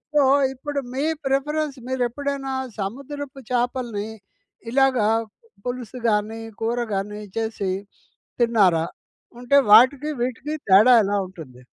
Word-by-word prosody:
So, 295 - +6 0.3
ఇప్పుడు 285 +2 -4 0.2
మీ 275 +3 0 0.2
preference. 290 +1 -1
మీరు 260 -1 0
ఎప్పుడైనా 275 +1 -3 0.3
సముద్రపు 275 +6 -6
చేపల్ని. 240 -4 -1 0.6
ఇలాగ 270 -1 +3 0.7
పులుసు 250 0 -5
గానీ, 215 +1 -1 0.2
కూర 230 +2 0 0.2
గానీ, 210 +2 -4 0.2
చేసి 220 -4 -2 0.7
తిన్నారా? 195 -9 +3 0.5
ఉంటే 250 +3 +2 0.2
వాటికి 260 +7 +6
వీటికి 255 +5 -3
తేడా 205 +6 +7
ఎలా 200 +1 0
ఉంటుంది? 160 -9 -12
245 Hz, 105 wpm, -23 LUFS, 210-275 Hz, 0.7 s, తేడా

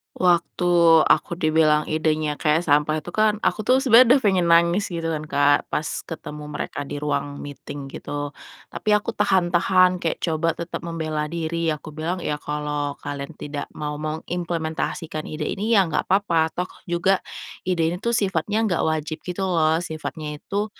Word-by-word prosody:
Waktu 175 0 +2 0.3
aku 170 - +2
dibilang 155 -2 +3
idenya 155 -1 0
kayak 155 +2 +2
sampah 150 +1 +2
itu 175 - -6
kan, 215 0 +3
aku - - +1
tuh 255 - +5
sebenernya 250 0 +7
udah - - +3
pengen 185 -4 +3
nangis 170 +4 +4
gitu 165 -2 -3
kan, 155 - -3
Kak, 145 0 +3
pas 150 - -1
ketemu 150 -2 -6
mereka 150 -1 -4
di - - -5
ruang 145 -1 -2
meeting 145 0 -8
gitu. 145 0 -5 0.4
Tapi - - -4
aku 210 +3 -4
tahan-tahan 185 -2 +3
kayak 165 - -1
coba 165 0 0
tetep 170 0 -5
membela 155 -2 -3
diri. 165 0 -2
Aku 155 0 -4
bilang, 165 +4 -2
"Ya 150 0 -2
kalau 150 -1 -3
kalian 145 +2 -6
tidak 145 -1 -5
mau 150 -1 -3
mengimplementasikan 160 0 -3
ide 155 0 -4
ini 220 +4 0
ya 190 - +5
gak 160 - -2
apa-apa 170 -5 +2
toh 180 +1 -2 0.2
juga 185 +2 +2 0.5
ide 175 -3 +1
ini 180 - -4
tuh 235 +1 0
sifatnya 205 +1 0
gak 180 -6 0
wajib 155 0 -3
gitu 180 +2 -3
loh," 160 -3 +2
sifatnya 150 -1 -6
itu, 205 +1 -2
165 Hz, 165 wpm, -23 LUFS, 150-180 Hz, 0.5 s, sebenernya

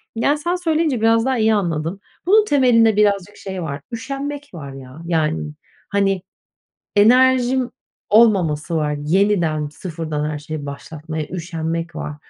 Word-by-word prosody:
yani, 280 +6 +2
sen 345 +4 -1
söyleyince 320 -7 0
biraz 225 +1 +3
daha 260 -1 +1
iyi 220 0 +3
anladım. 170 -2 -1 0.3
Bunun 420 +4 +5
temelinde, 235 - +4
birazcık 205 -1 +1
şey 190 -2 -6
var 140 -2 -5
üşenmek 280 +4 -5
var 140 -5 -8
ya. 135 +3 -11
Yani, 150 - -1 0.4
hani, 195 -2 +1 0.8
enerjim 255 +3 +4 0.4
olmaması 180 -8 +3
var. 150 -2 0
Yeniden, 165 -2 +1
sıfırdan 155 -2 -4
her 150 - -4
şeyi 150 0 -6
başlatmaya 155 +2 -6
üşenmek 165 -1 -4
var. 150 - -5
190 Hz, 130 wpm, -20 LUFS, 155-235 Hz, 0.8 s, Bunun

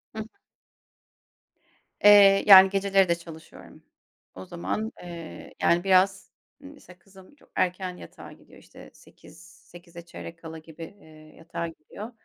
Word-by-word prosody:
Hı - - -6
hı. 220 - -7 1.8
Eee, 200 -1 +6
yani, 190 -1 +9
geceleri 195 -1 +1
de 170 - +2
çalışıyorum. 165 -2 -15 0.5
O 95 0 -10
zaman, 215 - -5
eee, 170 -2 -11
yani, 170 +1 +1
biraz, 190 0 +1 0.3
ııı, 280 - -12
mesela 180 -11 -19
kızım 195 +6 -20
çok 290 - -27
erken 180 0 -3
yatağa - - -13
gidiyor. - - -19
İşte - - -17
8, - - -20 0.3
8'e 175 0 -14
çeyrek 170 -1 -11
kala 160 -1 -10
gibi, 160 +1 -13 0.2
eee, 155 -3 -19
yatağa 170 0 -7
gidiyor. 165 +7 -12
180 Hz, 135 wpm, -25 LUFS, 165-195 Hz, 1.8 s, yani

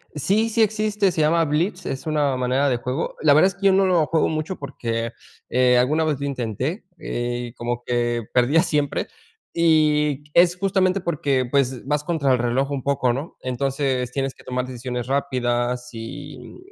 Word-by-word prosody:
Sí, 200 +10 +1
sí 225 +1 +1
existe, 215 -1 +2
se 170 -2 -1
llama 165 +2 +3
Blitz, 170 +5 -1
es 135 - -4
una 150 -3 +1
manera 130 +2 +1
de 130 - +2
juego, 125 +6 -3
la 150 -2 +5
verdad 155 +6 +6
es 195 - -4
que 195 +1 +1
yo - - +6
no 190 +1 +4
lo 175 -4 +3
juego 160 -1 +2
mucho 155 +4 -3
porque, 115 -4 -4 0.4
eh, 125 0 +4
alguna 145 +6 +2
vez 155 -3 0
lo 140 - -3
intenté, 130 - -3 0.2
eh, 120 0 -4
como 120 0 -3
que 120 -1 0
perdía 130 +6 +4
siempre 150 -5 -1 0.5
y 150 -3 +2
es 175 0 +5
justamente 190 0 +1
porque, 140 -7 0
pues, 130 -2 0
vas 150 +1 0
contra 150 -5 +1
el 125 - +1
reloj 125 +4 0
un 135 -2 -3
poco, 135 -3 +1
¿no?, 140 +6 -6
entonces 130 0 -1
tienes 135 0 -2
que - - -18
tomar 125 0 -2
decisiones 125 -1 -5
rápidas 125 -3 -1
y 115 0 -9
140 Hz, 180 wpm, -22 LUFS, 125-160 Hz, 0.5 s, verdad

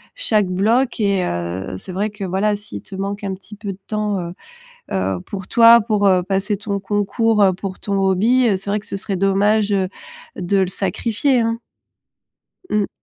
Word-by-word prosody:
chaque 215 - +1
bloc 225 +8 +1
et 200 -3 +2
heu, 85 - -3
c'est 185 - -8
vrai 200 +4 -1
que 205 -1 -8
voilà, 195 +3 +1
s'il 210 +1 -8
te 195 - -10
manque 200 +1 -4
un 195 -1 -2
petit 210 +3 -13
peu 205 -2 -5
de 185 - -9
temps, 210 -2 -1
heu 175 0 -5 0.6
heu, 95 - -1
pour 190 -2 -7
toi, 235 0 +7
pour, 210 -2 +1
heu, 185 -1 +4
passer 195 +1 0
ton 200 -1 -3
concours, 205 +2 +1
heu, 190 -1 +5
pour 190 0 -6
ton 200 -1 -2
hobby, 220 +6 +3
c'est 195 - -9
vrai 210 0 0
que - - -15
ce - - -4
serait 195 0 -3
dommage, 200 +2 +2
heu, 190 -2 +1 0.5
de 195 +3 0
le 190 -1 +2
sacrifier, 230 +7 0
hein. 230 0 0 1.1
Mmh. 210 -1 +1
200 Hz, 190 wpm, -20 LUFS, 190-215 Hz, 1.1 s, toi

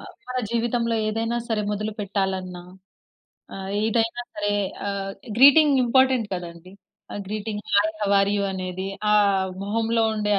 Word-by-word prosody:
ఆహ్, - - -11 0.2
మన 255 - -4
జీవితంలో 235 0 0
ఏదైనా 225 +2 -1
సరే 220 -2 0
మొదలు 215 +1 -3
పెట్టాలన్నా. 190 -3 -3 0.9
ఆహ్, 195 0 -6
ఏదైనా 230 +2 0
సరే 205 0 -1 0.3
ఆహ్, 195 -1 -3 0.3
గ్రీటింగ్ 280 +1 +7
ఇంపార్టెంట్ 260 -2 +3
కదండీ. 175 +1 -9 0.4
ఆ - - -5
greeting 210 0 -4
hi, 205 +2 +4
how 205 - 0
are 195 - +2
you 200 - 0
అనేది 185 0 -4 0.2
ఆహ్, 200 -2 +3
మొహంలో 225 +2 0
ఉండే 210 -1 -1
210 Hz, 140 wpm, -24 LUFS, 195-230 Hz, 0.9 s, గ్రీటింగ్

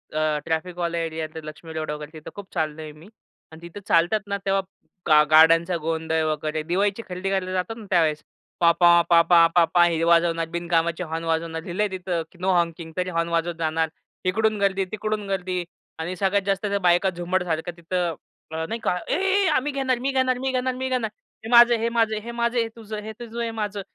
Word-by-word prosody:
अ, 155 -1 +1
ट्रॅफिकवाले 170 +1 -2
एरियात 160 -1 -5
लक्ष्मी 155 +2 -9
रोड 155 -1 -3
वगैरे 150 0 -7
तिथं 155 - -9
खूप 200 -2 -9
चाललोय 155 -2 -3
मी. 155 +4 -16 0.4
आणि 160 +1 -13
तिथं 175 - -10
चालतात 175 +6 +3
ना, 200 - -1
तेव्हा 195 0 +2 0.5
गा 150 -2 +7
गाड्यांचा 165 +3 +6
गोंधळ 160 0 -1
वगैरे, 155 +1 -2
दिवाळीची 195 +6 0
खरेदी 180 +2 -3
करायला 190 -1 -1
जातात 185 +4 -2
ना 220 - -10
त्यावेळेस. 160 -4 +2 0.4
पॉपॉ, 170 0 +5
पॉपॉ, 170 0 +6
पॉपॉ 175 0 +5
हे 165 -1 +1
वाजवणार 170 -1 +3
बिनकामाचे 170 0 0
हॉर्न 165 0 -4
वाजवणार. 165 0 -1
लिहिलंय 200 +4 -1
तिथं 180 -2 -2
की - - -20
नो 190 - +2
हॉकिंग 170 -1 -1
तरी 185 0 -1
हॉर्न 170 -1 -1
वाजवत 170 0 -1
जाणार. 160 0 0 0.4
इकडून 215 +3 +1
गर्दी, 195 -1 +1
तिकडून 215 -1 -3
गर्दी 185 -2 -2 0.4
आणि 175 +3 -3
सगळ्यात 195 +2 +1
जास्त 195 +1 0
त्या 200 -1 0
बायका 180 +1 +3
झुंबडसारख्या 175 -1 -2
तिथं 170 0 -2 0.4
अ, 160 0 -3
नाही 230 - -3
का, - - +1
"ए, - - 0
ए 390 +2 +2
आम्ही 290 +3 0
घेणार, 265 -3 0
मी 270 +2 -1
घेणार, 260 -1 +1
मी 265 0 -1
घेणार, 255 0 0
मी 260 +1 -3
घेणार. 250 -4 0 0.4
हे - - -5
माझं 240 0 +8
आहे. 230 - 0
हे 230 - +1
माझं 225 -2 +1
आहे. 215 - -4
हे 235 - -5
माझं 235 +1 -1
आहे. 235 - +3
हे 225 - -5
तुझं. 215 -2 -7
हे 220 - -6
तुझं 235 -1 -9
आहे." 235 - 0
हे - - -4
माझं 210 -2 -3
175 Hz, 205 wpm, -24 LUFS, 165-210 Hz, 0.5 s, माझं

